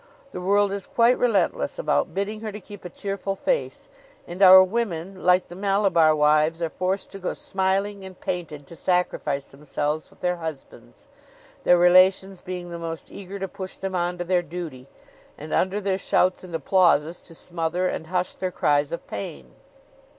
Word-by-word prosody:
The 180 - -6
world 200 +2 +2
is 200 -1 -5
quite 235 +1 +3
relentless 230 -5 +1
about - - 0
bidding 210 +2 -3
her 220 -1 -4
to 210 - -8
keep 205 0 -12
a 180 - -7
cheerful 195 +1 -4
face; - - -2 0.4
and 175 +3 -8
our 185 -1 +10
women, 185 -3 -3
like 180 0 +4
the 175 - -10
Malabar 195 -5 +3
wives, 155 +2 +3
are 165 -2 -2
forced 185 +2 -2
to 195 - -8
go 185 - -3
smiling 195 +1 -1
and 190 -1 -11
painted 155 -5 -5
to 170 - -12
sacrifice 155 -6 -1
themselves 150 +2 -3
with - - -24
their 180 0 0
husbands; 160 -4 -9 0.6
their 180 - +6
relations 185 +2 +4
being 180 -1 -6
the 170 - -6
most 165 -1 -6
eager 200 0 -8
to 195 0 -4
push 190 0 -8
them 190 0 -5
on 175 0 -1
to 175 - -3
their 180 0 +1
duty, 160 -6 -7 0.5
and, 155 +1 -7
under 190 +2 +1
their 195 -1 -1
shouts 185 0 +1
and 175 -3 -7
applauses, 165 0 +2
to 165 - -15
smother 175 +2 -2
and 160 - -4
hush 180 +1 -1
their 185 - -3
cries 145 -4 +1
of 170 - -5
pain. 70 -11 -7
180 Hz, 180 wpm, -24 LUFS, 165-195 Hz, 0.6 s, our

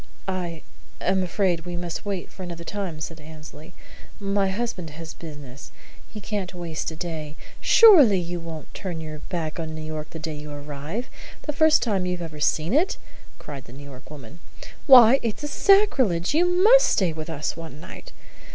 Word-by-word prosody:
"I 175 -4 -4 0.4
am 190 0 +1
afraid 180 -1 0
we 175 +1 -6
must 175 +2 -5
wait 195 -3 -4
for - - -12
another 170 -2 -6
time," 185 -4 -5
said 160 0 -6
Annesley. 155 +1 -12 0.5
"My 200 -1 0
husband 190 -5 -3
has 160 +1 -9
business. 145 -4 -10 0.4
He 215 - -8
can't 200 -3 -4
waste 170 -4 -4
a 160 - -8
day 155 -2 -6
" - - -20
"Surely 300 - +7
you 175 0 -4
won't 165 -3 -9
turn 180 -4 -5
your 155 -1 -7
back 165 -1 -5
on 160 -1 -5
New 155 - -6
York 155 -1 -6
the - - -8
day 160 0 -5
you 150 0 -8
arrive, 145 - -6 0.4
the 300 - -3
first 315 +1 +4
time 195 -6 0
you've 180 0 -2
ever 160 -3 -7
seen 155 +5 +1
it!" 325 +7 +2 0.4
cried 140 -3 -9
the 120 - -14
New 140 +2 -11
York 130 -1 -13
woman. 150 +1 -11 0.5
"Why, 255 -1 +9
it's 235 +6 -3
sacrilege! 275 - +3
You 340 +4 +3
must 415 +8 +6
stay 180 -5 +1
with 155 +1 -7
us 155 -2 -3
one 160 -3 -9
night. - - -11
170 Hz, 180 wpm, -24 LUFS, 155-200 Hz, 0.5 s, Why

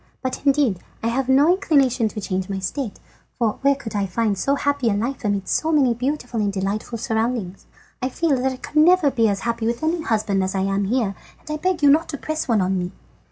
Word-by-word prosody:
But, 260 - -3
indeed, 270 -9 +3 0.2
I 230 - +1
have 260 +2 -1
no 275 +3 +5
inclination 275 - +2
to 215 - -5
change 190 -1 -3
my 195 - -2
state, 205 +5 -4 0.4
for 225 -4 0
where 280 0 +4
could 225 -6 -8
I 200 -1 0
find 210 +2 0
so 275 +9 +1
happy 285 -3 0
a - - +2
life 245 +6 -3
amidst 200 -2 0
so 320 - 0
many 275 -6 +4
beautiful 245 -2 -2
and 205 -1 0
delightful 200 +4 -3
surroundings? 225 -5 -2 0.3
I 255 - 0
feel 315 +1 +1
that 265 +1 +1
I 260 - -6
could 295 - -7
never 320 -1 +5
be 230 -3 +2
as 200 -1 -2
happy 230 -1 -1
with 235 +4 -2
any 325 +2 0
husband 215 -6 0
as 190 +1 -2
I 190 - +1
am 195 +1 0
here, 220 -2 0 0.3
and 305 - -10
I 305 - -1
beg 360 -1 -1
you 285 - +7
not 320 +3 +3
to 285 - -4
press 310 +3 -3
one 225 -5 +2
on 185 0 0
me." 180 0 -3
235 Hz, 235 wpm, -22 LUFS, 205-280 Hz, 0.4 s, you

